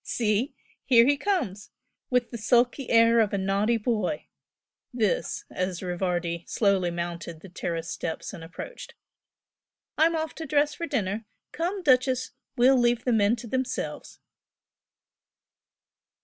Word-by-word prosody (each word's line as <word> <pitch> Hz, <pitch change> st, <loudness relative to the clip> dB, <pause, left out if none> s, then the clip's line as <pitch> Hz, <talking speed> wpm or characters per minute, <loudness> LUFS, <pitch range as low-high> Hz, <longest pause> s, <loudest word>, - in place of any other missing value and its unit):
"See! 230 Hz, +4 st, 0 dB, 0.3 s
here 235 Hz, -3 st, +6 dB
he 285 Hz, +2 st, +4 dB
comes, 280 Hz, -, -2 dB, 0.4 s
with 250 Hz, -2 st, +1 dB
the 235 Hz, -, -5 dB
sulky 245 Hz, +4 st, +2 dB
air 230 Hz, 0 st, +5 dB
of 215 Hz, -3 st, +2 dB
a -, -, +1 dB
naughty 200 Hz, +4 st, +1 dB
boy!" 230 Hz, +6 st, -1 dB, 0.7 s
this, 225 Hz, -6 st, -1 dB
as 185 Hz, -1 st, -3 dB
Rivardi 175 Hz, -2 st, -2 dB
slowly 195 Hz, -4 st, +2 dB
mounted 170 Hz, -1 st, -5 dB
the 195 Hz, -, -11 dB
terrace 170 Hz, -1 st, -4 dB
steps 160 Hz, -, -4 dB
and 170 Hz, -4 st, -8 dB
approached 180 Hz, -, -9 dB, 1.0 s
"I'm 330 Hz, +1 st, +4 dB
off 315 Hz, -1 st, -2 dB
to 320 Hz, -, -5 dB
dress 295 Hz, +1 st, +2 dB
for 335 Hz, -, -4 dB
dinner 215 Hz, -, -2 dB, 0.3 s
come, 360 Hz, +4 st, -2 dB
'Duchess!' 255 Hz, -2 st, +3 dB, 0.3 s
We'll 255 Hz, +2 st, +5 dB
leave 240 Hz, 0 st, +2 dB
the 250 Hz, -, +2 dB
men 210 Hz, +1 st, +3 dB
to 235 Hz, 0 st, -9 dB
themselves!" 260 Hz, +2 st, -3 dB
230 Hz, 135 wpm, -26 LUFS, 190-260 Hz, 1.0 s, here